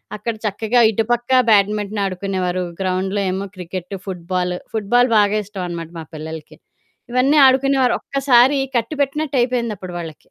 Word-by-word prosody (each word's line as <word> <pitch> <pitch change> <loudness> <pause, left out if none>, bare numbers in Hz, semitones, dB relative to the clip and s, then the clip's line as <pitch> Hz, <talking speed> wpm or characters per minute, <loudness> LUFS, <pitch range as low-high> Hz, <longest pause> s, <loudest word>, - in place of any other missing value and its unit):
అక్కడ 220 +2 -3
చక్కగా 220 +4 +1
ఇటుపక్క 235 +3 -1 0.2
బ్యాడ్మింటన్ 205 0 +2
ఆడుకునేవారు 185 -1 -2 0.2
గ్రౌండ్‌లో 190 +2 -1
ఏమో 195 +1 -3
క్రికెట్టు, 180 +1 -6
ఫుట్‌బాలు, 180 -1 -3 0.2
ఫుట్‌బాలు 240 +4 +2
బాగా 205 +1 +2
ఇష్టం 195 -2 -6
అనమాట 170 -1 -6
మా - - -6
పిల్లలకి. 155 0 -8 0.5
ఇవన్నీ 265 +4 +3
ఆడుకునేవారు 265 -1 +3
ఒక్కసారి 270 0 +3 0.2
కట్టి 235 +6 -3
పెట్టినట్టయిపోయింది 255 -6 0
అప్పుడు 185 -2 -8
వాళ్ళకి. 160 -4 -7
205 Hz, 130 wpm, -19 LUFS, 185-245 Hz, 0.5 s, ఇవన్నీ